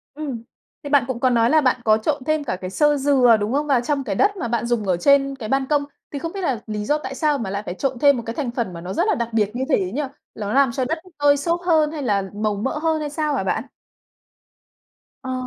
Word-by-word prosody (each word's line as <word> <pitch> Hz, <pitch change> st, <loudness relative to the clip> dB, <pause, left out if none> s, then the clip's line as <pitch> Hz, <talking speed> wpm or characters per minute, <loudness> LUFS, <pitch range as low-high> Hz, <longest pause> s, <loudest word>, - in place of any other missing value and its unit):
Ừm. 275 Hz, -7 st, -5 dB, 0.4 s
Thì 285 Hz, -, -6 dB
bạn 285 Hz, -3 st, +4 dB
cũng 260 Hz, -3 st, -3 dB
có 255 Hz, -, +3 dB
nói 230 Hz, -1 st, +3 dB
là 310 Hz, +3 st, +4 dB
bạn 255 Hz, -2 st, +1 dB
có 215 Hz, -1 st, +5 dB
trộn 280 Hz, +5 st, -2 dB
thêm 310 Hz, +1 st, 0 dB
cả 230 Hz, -, -2 dB
cái 185 Hz, -, -4 dB
xơ 295 Hz, +8 st, +2 dB
dừa, 265 Hz, -5 st, +4 dB
đúng 210 Hz, +3 st, -2 dB
không? 295 Hz, +2 st, 0 dB
Và 265 Hz, -4 st, +3 dB
trong 280 Hz, +1 st, -1 dB
cái 205 Hz, -6 st, -3 dB
đất 405 Hz, -, +2 dB
mà 240 Hz, -, -3 dB
bạn 235 Hz, 0 st, -1 dB
dùng 235 Hz, -2 st, 0 dB
ở 180 Hz, -2 st, +2 dB
trên 275 Hz, +6 st, +3 dB
cái 225 Hz, -5 st, -7 dB
ban 270 Hz, +1 st, +1 dB
công, 290 Hz, 0 st, +2 dB, 0.3 s
thì 285 Hz, -, -4 dB
không 330 Hz, +3 st, -4 dB
biết 395 Hz, -, -4 dB
là 265 Hz, -, -1 dB
lý 210 Hz, -1 st, -3 dB
do 295 Hz, +6 st, +2 dB
tại 270 Hz, -2 st, -6 dB
sao 300 Hz, 0 st, +1 dB
mà 230 Hz, -7 st, -4 dB
lại 200 Hz, +2 st, -3 dB
phải 180 Hz, -, -5 dB
trộn 260 Hz, +5 st, -2 dB
thêm 280 Hz, -1 st, +5 dB
một 235 Hz, -, -4 dB
cái 230 Hz, -, -5 dB
thành 270 Hz, -5 st, -2 dB
phần 235 Hz, -6 st, -3 dB
mà 170 Hz, -, -8 dB
nó 180 Hz, +2 st, -5 dB
rất 345 Hz, +5 st, +1 dB
là 425 Hz, -, +2 dB
đặc 235 Hz, -4 st, -2 dB
biệt 210 Hz, -2 st, +1 dB
như 255 Hz, -, -1 dB
thế 190 Hz, -10 st, +1 dB
nhỉ? 275 Hz, +8 st, -2 dB, 0.3 s
Ló 210 Hz, -1 st, -4 dB
làm 270 Hz, -2 st, +4 dB
cho 260 Hz, +1 st, -1 dB
đất 320 Hz, +5 st, -1 dB, 0.2 s
tơi 290 Hz, 0 st, +4 dB
xốp 335 Hz, +5 st, -1 dB
hơn 320 Hz, -4 st, +2 dB
hay 305 Hz, -3 st, -5 dB
là 205 Hz, -5 st, +1 dB
màu 210 Hz, 0 st, -1 dB
mỡ 240 Hz, +9 st, -2 dB
hơn, 320 Hz, 0 st, 0 dB
hay 300 Hz, -1 st, -3 dB
sao 300 Hz, 0 st, -1 dB
hả 225 Hz, -, -1 dB
bạn? 190 Hz, +4 st, -1 dB, 1.6 s
Ờ. 260 Hz, -1 st, -4 dB
265 Hz, 280 wpm, -22 LUFS, 225-295 Hz, 1.6 s, có